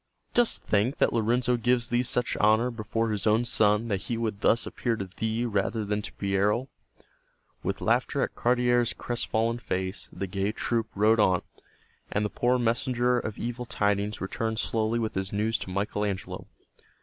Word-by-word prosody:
Dost 240 -1 +3
think 110 +6 +1
that - - +2
Lorenzo 120 +2 +2
gives 120 0 +1
thee 120 +1 +2
such 125 -1 0
honor 110 +4 +3
before 115 0 -2
his 105 0 -1
own 110 +3 +3
son 105 -1 +3
that 100 -2 0
he 115 +3 -3
would 110 -3 -2
thus 115 - +3
appear 120 -2 -1
to 100 - -4
thee 110 +2 -1
rather 105 0 -1
than 105 +1 -1
to 105 - -6
Piero?" 100 +6 0 0.9
With - - -3
laughter - - +1
at - - -3
Cardiere's 120 -1 +2
crestfallen 115 -1 -1
face 95 -2 -3
the 100 - -4
gay 95 +2 -2
troop 115 0 -1
rode 110 +3 +4
on, 95 -4 +3 0.7
and 105 +1 0
the 105 - -3
poor 125 +4 +2
messenger 125 +1 +1
of 110 - -5
evil 120 +1 -4
tidings 100 -1 0
returned 110 +3 -2
slowly 110 +1 0
with 110 -2 -1
his 95 0 -3
news 110 +2 0
to - - -7
Michael 100 +2 -1
Angelo. 100 -3 -4
110 Hz, 175 wpm, -27 LUFS, 105-120 Hz, 0.9 s, rode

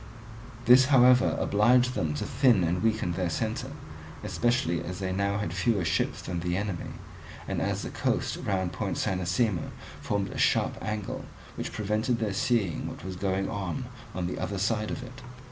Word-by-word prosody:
This, 125 +2 +8
however, 125 -2 +5
obliged 125 +5 +4
them 80 -10 -1
to - - -3
thin 125 -7 +4
and 85 +2 0
weaken 110 -4 +1
their 90 0 -1
centre, - - -2 0.5
especially 120 -9 0
as 90 +1 -5
they 95 -1 -2
had 100 +2 -1
fewer 105 -7 +1
ships 80 - 0
than 90 -1 -3
the 90 +1 -1
enemy, 100 -4 -3 0.5
and - - -2
as - - -1
the - - -5
coast - - -1
round 95 -3 -1
Point - - -2
Cynossema 90 +1 0 0.3
formed 100 -1 -1
a - - -5
sharp - - +2
angle 105 -2 -3 0.3
which - - -5
prevented 110 +4 0
their 110 -3 -1
seeing 105 -4 0
what - - -8
was 95 -1 -5
going 95 +1 -1
on 100 +6 -3 0.3
on 90 -1 -2
the 90 - -3
other 100 - -2
side 105 +2 0
of 130 - -4
it. 125 0 -10
100 Hz, 170 wpm, -28 LUFS, 90-120 Hz, 0.5 s, This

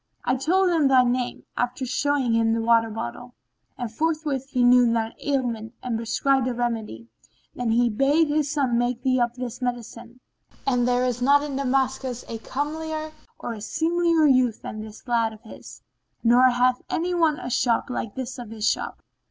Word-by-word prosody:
I 255 - +2
told 360 +8 +2
him 320 -5 +3
thy 260 -2 +5
name, 245 0 -1
after 245 +2 -2
showing 270 -1 0
him 225 0 +2
the 230 - 0
water 230 0 +3
bottle, 225 - -7 0.4
and 240 -3 -5
forthwith 300 -2 -1
he 255 -3 +1
knew 245 -1 +6
thine 225 -1 -1
ailment 240 -5 -2
and 245 -2 -2
prescribed 255 +3 +1
a 250 - -2
remedy. 225 - -3 0.5
Then 245 -2 -3
he 240 +2 +3
bade 275 +8 +2
his 295 -1 0
son 270 -5 +1
make 245 0 -1
thee 255 -1 +2
up 240 0 0
this 250 -1 -6
medicine; 240 0 -5 0.5
and 245 -2 +2
there 250 0 +2
is 245 -1 -2
not 285 +3 +4
in 290 -2 -4
Damascus 265 -2 -1
a 225 - -6
comelier 310 +5 -4 0.3
or 240 - -5
a 215 - -9
seemlier 335 +5 +1
youth 255 -5 +3
than 215 - -6
this 215 +3 -11
lad 230 -2 +1
of 215 - -15
his, 220 - -12 0.4
nor 245 +2 +6
hath 250 0 +2
anyone 335 -3 +1
a 245 - -6
shop 235 -1 +1
the 250 - -6
like 225 -2 -5
of 245 -3 -6
his 220 -1 -2
shop." - - -2
250 Hz, 180 wpm, -24 LUFS, 235-275 Hz, 0.5 s, knew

